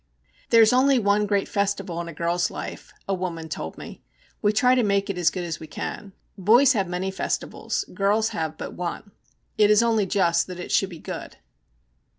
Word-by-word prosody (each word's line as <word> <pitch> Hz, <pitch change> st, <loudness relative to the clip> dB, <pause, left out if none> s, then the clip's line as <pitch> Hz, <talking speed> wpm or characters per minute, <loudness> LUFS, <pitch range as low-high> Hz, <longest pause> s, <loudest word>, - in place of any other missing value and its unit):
'There 230 Hz, -1 st, +7 dB
is 220 Hz, -, +4 dB
only 265 Hz, +1 st, +4 dB
one 210 Hz, -2 st, +2 dB
great 200 Hz, -1 st, +1 dB
festival 195 Hz, -4 st, -2 dB
in 170 Hz, -, -7 dB
a -, -, -6 dB
girl's 170 Hz, +2 st, 0 dB
life,' -, -, -8 dB, 0.2 s
a 195 Hz, -, 0 dB
woman 175 Hz, -3 st, -4 dB
told 80 Hz, -, -6 dB
me. -, -, -10 dB, 0.4 s
'We 210 Hz, 0 st, +2 dB
try 250 Hz, +4 st, +4 dB
to 255 Hz, -, +3 dB
make 200 Hz, -2 st, +1 dB
it 190 Hz, -, -7 dB
as 175 Hz, -, +4 dB
good 180 Hz, -, -5 dB
as 170 Hz, -2 st, -4 dB
we 160 Hz, -, -9 dB
can. 200 Hz, +4 st, -6 dB, 0.3 s
Boys 240 Hz, +9 st, +5 dB
have 195 Hz, -5 st, 0 dB
many 180 Hz, +2 st, -3 dB
festivals, 190 Hz, -, -3 dB
girls 210 Hz, +2 st, +1 dB
have 160 Hz, -1 st, -4 dB
but -, -, -6 dB
one. 180 Hz, +4 st, -5 dB, 0.5 s
It 210 Hz, -1 st, +6 dB
is 210 Hz, +2 st, +5 dB
only 225 Hz, -4 st, +2 dB
just 170 Hz, -4 st, +2 dB
that 180 Hz, -1 st, -8 dB
it 180 Hz, -, -6 dB
should 195 Hz, -, +2 dB
be 170 Hz, -, -9 dB
good.' -, -, -8 dB
195 Hz, 200 wpm, -24 LUFS, 175-210 Hz, 0.5 s, There